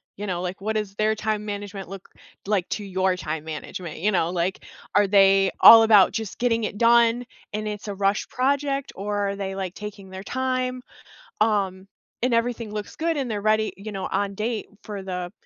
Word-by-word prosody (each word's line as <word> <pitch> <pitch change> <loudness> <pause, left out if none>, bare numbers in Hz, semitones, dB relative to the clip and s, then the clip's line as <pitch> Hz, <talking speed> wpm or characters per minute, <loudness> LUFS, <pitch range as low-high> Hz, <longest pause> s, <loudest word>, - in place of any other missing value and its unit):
you 205 +1 -6
know, 180 -2 -2
like 185 +2 -5
what 215 +2 -1
is 205 -2 -4
their 215 +1 +1
time 215 -1 -2
management 205 -2 -6
look 195 -1 -10 0.4
like 195 -3 0
to 210 - -3
your 190 -1 0
time 155 -3 -4
management, 160 +2 -6
you 210 +5 +1
know, 170 -4 +1
like, 180 +1 -2 0.3
are 205 0 +5
they 195 -1 +5
all 225 0 +10
about 210 -4 +6
just 220 -3 -5
getting 230 -2 +1
it 205 - -5
done 235 +1 +4 0.3
and 215 0 -3
it's 210 0 -5
a 200 - -4
rushed 200 +1 0
project? 275 +1 0
Or 205 0 -2
are 200 - -3
they 195 -1 -4
like 190 -2 -4
taking 205 -2 -8
their 190 0 -8
time, 255 +1 -2 0.6
um, 195 -3 +1 0.4
and 250 -1 +2
everything 230 -2 -1
looks 210 -1 -6
good 330 0 0
and 265 -4 -2
they're 210 -2 -2
ready, 215 +1 +1
you 205 +2 -8
know, 195 - -4
on 200 -1 -1
date 220 +2 -3 0.2
for 205 -2 -6
the 180 -1 -5
205 Hz, 200 wpm, -24 LUFS, 195-225 Hz, 0.6 s, all